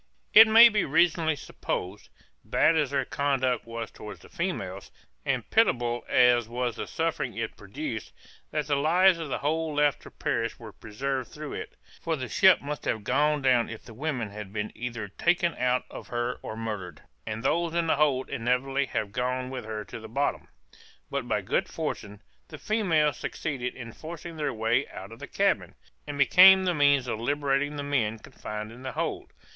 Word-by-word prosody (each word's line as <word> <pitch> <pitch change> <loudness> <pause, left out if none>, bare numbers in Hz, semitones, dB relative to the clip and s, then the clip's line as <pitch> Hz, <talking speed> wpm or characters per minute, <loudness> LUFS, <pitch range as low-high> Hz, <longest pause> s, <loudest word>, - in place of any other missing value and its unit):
_] - - -42 0.3
It 220 +1 +10
may 225 +2 +9
be 210 -4 +1
reasonably 160 +1 +2
supposed, 95 -7 -5 0.3
bad 165 - +3
as 150 -4 +1
their 135 -1 0
conduct 130 -5 0
was 115 -1 -5
towards 105 - -10
the - - -15
females, 135 - -4 0.4
and 130 -5 0
pitiable 120 - +2
as 120 -2 +4
was 120 -1 -2
the - - -4
suffering - - -2
it - - -3
produced, - - -6 0.4
that 150 -1 -2
the 145 -1 +1
lives 175 +5 +4
of 160 -3 -5
the - - -1
whole 155 +1 -1
left 145 -1 +2
to - - -12
perish 115 -2 -2
were 115 -2 -10
preserved 130 +4 -4
through 150 -1 -7
it; - - -7 0.3
for 165 -1 -1
the 130 -4 -5
ship 190 +1 +5
must 145 -2 -5
have 110 - -1
gone 145 +5 +1
down 125 -3 +3
if 110 - -8
the 115 - -12
women 125 -4 -3
had 105 -1 -8
been 105 0 -3
either 115 -3 -5
taken 170 - +1
out 125 0 +1
of - - -9
her 120 +1 -2
or 110 - -7
murdered, 105 -8 -5 0.2
and 110 +1 -4
those 170 -1 0
in 170 -1 +1
the 160 - +2
hold 140 -3 +2
inevitably 135 +2 0
have 105 -3 -3
gone 125 +2 -2
with 130 -4 -5
her 110 -1 -5
to - - -8
the 110 0 -10
bottom. 140 +5 -1 0.6
But - - -2
by - - 0
good - - 0
fortune, 105 0 -5 0.2
the 155 - -9
females 165 -8 +1
succeeded 125 -5 -4
in 115 -3 -8
forcing 165 +1 -8
their 150 -2 -1
way 115 +4 0
out 95 +3 -10
of 115 - -11
the - - -8
cabin, - - 0 0.3
and 145 -1 -5
became 190 +6 +8
the 180 -1 +1
means 145 -3 +3
of 115 -3 -3
liberating 145 +2 0
the 145 - -4
men 120 -6 0
confined 105 0 -7
in 120 +2 -12
the 130 - -5
hold. - - -3
130 Hz, 190 wpm, -27 LUFS, 115-150 Hz, 0.6 s, It